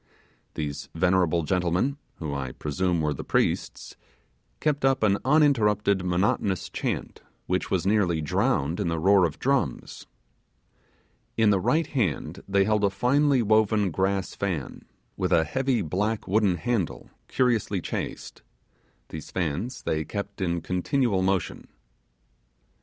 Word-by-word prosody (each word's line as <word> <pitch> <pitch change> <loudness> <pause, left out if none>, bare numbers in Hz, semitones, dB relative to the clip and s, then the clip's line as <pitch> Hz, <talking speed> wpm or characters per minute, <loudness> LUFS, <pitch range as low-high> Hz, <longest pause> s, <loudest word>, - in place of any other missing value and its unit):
These 75 -2 -4
venerable 90 -1 +2
gentlemen, 90 - 0 0.2
who 75 -3 -5
I 65 -2 -4
presume 85 +3 -1
were 75 -1 0
the - - -7
priests, - - -1 0.6
kept 150 -2 0
up 135 -3 +2
an 100 -2 +3
uninterrupted 110 -9 +3
monotonous 90 +1 0
chant, - - -4 0.2
which 90 0 -1
was 95 -2 0
partly 95 -5 +2
drowned 75 +2 0
in 100 - -1
the 80 0 -1
roar 95 +3 +4
of 80 -3 -3
drums. 140 0 -2 1.3
In 110 -2 +4
the 100 - +3
right 155 - +1
hand 95 - -2
they 100 0 +3
held 105 0 +1
a 100 - +4
finely 130 +6 +2
woven 110 -2 +2
grass 95 +2 -1
fan, 90 -9 -4 0.3
with 90 -1 -1
a 85 -2 +4
heavy 130 - 0
black 105 +7 -2
wooden 100 -1 +2
handle 95 +1 -2 0.2
curiously 115 -6 +1
chased: - - -5 0.7
these 80 -2 -8
fans 90 - -3
they 80 0 -1
kept 100 +3 -6
in 85 -2 -1
continual 100 - 0
motion. 95 -2 -1
95 Hz, 130 wpm, -26 LUFS, 85-110 Hz, 1.3 s, roar